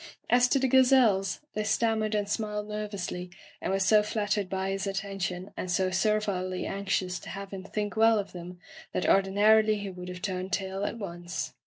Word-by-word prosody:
As 245 0 +6
to 275 - +2
the 265 0 +2
gazelles, 250 -7 +4
they 215 - -1
stanmiered 215 0 +1
and 205 -1 0
smiled 210 0 -2
nervously, 200 -4 -4 0.3
and - - -2
were 195 - +2
so 210 +2 +5
flattered 210 -2 -1
by 190 0 -2
his 195 +1 -2
attention 195 -1 -3
and 185 - -4
so 185 +1 +1
servilely 190 -2 0
anxious 195 -2 -1
to - - -10
have 195 0 -7
him 190 -1 -6
think 205 +1 -3
well 225 0 +5
of 200 -1 -3
them 180 0 -9 0.4
that - - 0
ordinarily 210 +3 +4
he 200 -1 -5
would 180 0 -8
have 180 0 -8
turned 185 -1 -3
tail 195 +1 -2
at 230 - -3
once. 175 -3 -5
200 Hz, 185 wpm, -28 LUFS, 185-215 Hz, 0.4 s, As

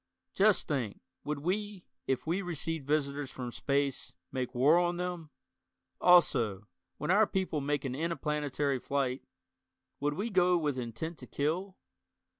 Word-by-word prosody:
Just 205 -1 +4
think, 125 -9 -2 0.2
would 150 -1 -3
we, 200 +3 -2 0.2
if 135 - 0
we 170 +5 0
received 165 -4 -3
visitors 145 -2 0
from 125 -2 -6
space, 140 +1 -1 0.2
make 130 -1 -3
war 145 +7 +5
on 175 0 +1
them? 175 -3 -4 0.7
Also, 115 - +4 0.3
when - - -1
our 210 +2 +5
people 185 -6 -1
make 145 +1 -1
an 130 - -2
interplanetary 150 -3 -1
flight, 135 -1 -1 0.8
would 145 +1 0
we 215 +7 -2
go 180 -2 +4
with 150 -4 0
intent 125 +8 -5
to - - -9
kill? 175 +7 -2
150 Hz, 140 wpm, -31 LUFS, 140-175 Hz, 0.8 s, war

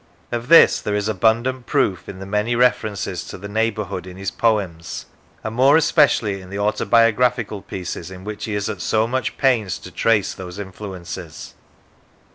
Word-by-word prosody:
Of 120 0 -3
this 165 +2 +7
there 105 - -2
is 105 0 -1
abundant 115 +5 +1
proof 95 -3 0
in 95 - -7
the 95 - -8
many 105 +4 0
references 110 -5 0
to - - -8
the 100 - -8
neigh 110 +2 +1
bourhood 95 -3 -5
in 90 0 -10
his 95 0 -3
poems, 95 -8 -1 0.4
and 110 - -4
more 135 +5 +5
especially 145 - +3
in 90 - -12
the 100 - -5
autobiographical 115 +1 +2
pieces 90 -2 -6
in 95 0 -10
which 105 0 -5
he 110 - -3
is 100 0 -1
at 100 -5 -4
so 110 +6 +2
much 130 +3 -2
pains 120 -8 +2
to - - -11
trace 110 -3 +1
those 90 0 -9
influences. 95 -4 -8
105 Hz, 175 wpm, -21 LUFS, 95-115 Hz, 0.4 s, this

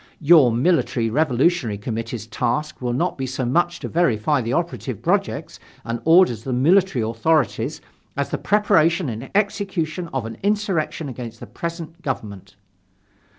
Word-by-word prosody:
"Your 150 -5 +6
Military 120 -3 +1
Revolutionary 140 - +1
Committee's 115 +1 -5
task 120 +7 -2
will 125 -1 -1
not 145 +6 -1
be 135 - -2
so 130 0 -3
much 170 +7 +1
to - - -4
verify 145 -4 +1
the 115 0 -3
operative 140 - -2
projects 180 -4 -1 0.3
and 115 0 -3
orders 160 - +5
of 115 - -19
the 130 - -2
military 155 - +3
authorities 120 +7 0 0.4
as - - -2
the - - -2
preparation 180 -6 +2
and 115 +3 -6
execution 190 -5 -1
of 130 -4 -2
an 115 - -8
insurrection 195 -7 -1
against 120 -3 -7
the - - -8
present 170 -1 -7
government." 100 - -5
145 Hz, 150 wpm, -22 LUFS, 120-170 Hz, 0.4 s, Your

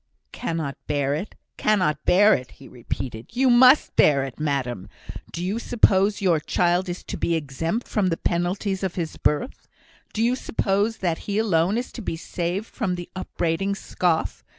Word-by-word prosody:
"Cannot 165 - -3
bear 140 -1 0
it! 160 +8 -4 0.2
cannot 185 -8 +1
bear 205 +4 +6
it!" 125 - -3
he 135 - -14
repeated. 120 -1 -6
"You 260 0 +4
must 255 +4 +6
bear 140 -3 +4
it, 135 0 -7
madam. 130 -9 -2 0.4
Do 175 +1 -4
you 205 +5 -1
suppose 205 -4 +2
your 170 -4 +3
child 175 +4 +1
is 175 - -5
to - - -6
be 170 - 0
exempt 165 - -3
from 205 -4 +1
the 165 -2 0
penalties 185 +3 -1
of 190 -2 -2
his 165 -3 -4
birth? 150 - -1 0.4
Do 220 - -1
you 245 +2 +2
suppose 210 -2 0
that 165 -2 0
he 200 - 0
alone 195 -2 +2
is 245 - -4
to 235 - -8
be 185 - -3
saved 175 +4 -3
from 200 -7 -3
the 175 -1 -8
upbraiding 185 +1 -1
scoff? 175 -4 -1
180 Hz, 175 wpm, -24 LUFS, 155-205 Hz, 0.4 s, bear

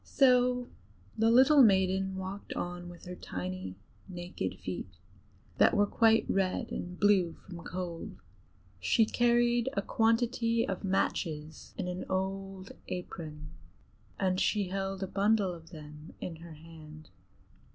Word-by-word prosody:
So 250 -2 +3 0.5
the 225 +1 +3
little 265 +5 +7
maiden 190 -3 +3
walked 190 +2 -6
on 175 0 -4
with 175 -1 -12
her 180 - -6
tiny 95 - -5 0.3
naked 175 0 -5
feet, - - -6 0.6
that - - +5
were 205 - +5
quite 225 +2 +4
red 190 -1 0
and 180 +1 -5
blue 195 -5 +4
from 175 -3 -9
cold. 175 - -6 0.6
She 95 - +3
carried 240 +1 +2
a 200 - -1
quantity 230 +1 +1
of 195 - -3
matches 160 -5 -2
in - - -3
an 180 0 -4
old 195 0 -3 0.2
apron, 155 -4 -6 0.7
and 185 -1 +1
she 200 -3 +1
held 195 0 -3
a - - -2
bundle 200 -1 +2
of 165 -1 -12
them 150 0 -11
in 165 -3 -6
her 165 0 -11
hand. 155 -2 -13
190 Hz, 130 wpm, -31 LUFS, 170-220 Hz, 0.7 s, little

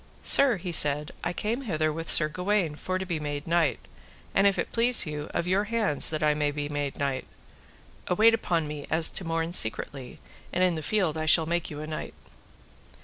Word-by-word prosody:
Sir, 270 -6 +4
he 175 0 -6
said, 150 -2 +3
I 175 - -2
came 220 +8 -3
hither 155 - -2
with 165 +1 -6
Sir 155 - +6
Gawaine 180 0 -2
for 185 +5 -4
to 190 - -5
be 170 -4 -4
made 145 -1 -5
knight, 165 -2 0 0.6
and 195 +1 +3
if 200 - 0
it - - -3
please 235 -1 +4
you, 150 -1 -6
of 170 - -3
your 190 +3 0
hands 215 -9 +3
that 155 -1 -3
I 150 0 +3
may 150 0 -1
be 145 0 -5
made 145 -1 -4
knight. 135 -2 -3 0.8
Await 220 +5 +4
upon 170 -8 -1
me 150 -1 -8
as 160 0 +4
to - - -6
morn 165 0 -3
secretly, 125 -1 0 0.3
and 180 - 0
in 180 -1 +2
the 160 - -5
field 170 -4 -1
I 155 - -4
shall 160 +1 +4
make 170 +1 -3
you 150 -1 -8
a - - -6
knight. 155 0 -7
165 Hz, 205 wpm, -26 LUFS, 150-185 Hz, 0.8 s, Sir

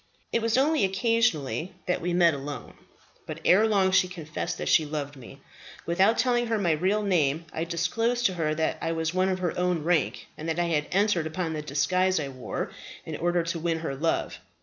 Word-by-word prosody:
"It 230 - +2
was 230 +1 +1
only 300 +1 +3
occasionally 190 - 0
that 180 - -1
we 175 +1 -1
met 175 -1 +4
alone; 140 -2 -6 0.5
but - - -6
ere 210 +5 +5
long 195 -3 +3
she 185 -1 +4
confessed 165 -4 -5
that - - -4
she 160 - +5
loved 145 -1 -4
me. 130 -4 -13 0.4
Without 190 +7 +3
telling 240 -1 +2
her 225 -1 0
my 180 -5 +1
real 190 +7 +1
name, 165 -5 +1
I 160 - -2
disclosed 225 +9 0
to 190 - +3
her 155 -3 -1
that 160 0 -1
I 165 0 -1
was 160 0 -1
of 185 0 +1
her 180 -3 -2
own 180 -3 0
rank, 165 -2 0
and 160 +2 -4
that 160 - -1
I 175 -1 +1
had 150 -2 0
entered 195 -4 +2
upon 160 0 -3
the 155 - -3
disguise 180 +6 +1
I 140 -2 -3
wore 130 -2 -5 0.3
in - - -5
order 175 0 +1
to 170 0 -3
win 165 0 0
her 150 -4 -3
love. 160 +4 -1
175 Hz, 205 wpm, -27 LUFS, 155-190 Hz, 0.5 s, ere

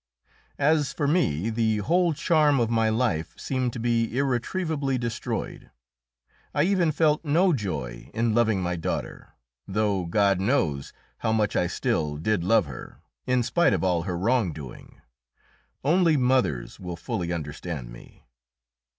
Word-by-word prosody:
As 145 -1 +2
for 145 - -1
me, 115 - +1
the 110 -1 +1
whole 170 - +2
charm 150 -3 +3
of 115 -1 +1
my 115 -1 +2
life 110 -9 -1
seemed 130 -2 -1
to 120 - -5
be 115 0 0
irretrievably 140 +2 -1
destroyed. 120 -2 -4 0.9
I 145 - +3
even 180 -3 +2
felt 155 0 +2
no 170 +4 +3
joy 75 - -4
in 115 0 0
loving 110 -5 +2
my 90 0 -1
daughter, 80 - -5 0.3
though 100 -2 0
God 100 +1 +2
knows 95 - 0 0.3
how 110 - 0
much 110 -1 +1
I - - +2
still 75 -2 -1
did 95 +3 0
love 100 +1 +3
her, 70 -3 -10 0.3
in 125 -1 +2
spite 175 +8 +2
of - - -1
all 90 -3 +2
her 90 0 -3
wrongdoing. 90 - -2 0.8
Only 165 +1 +3
mothers 125 - 0
will 90 -2 -6
fully 90 -4 -3
understand 75 -4 -5
me. - - -15
115 Hz, 140 wpm, -26 LUFS, 90-140 Hz, 0.9 s, charm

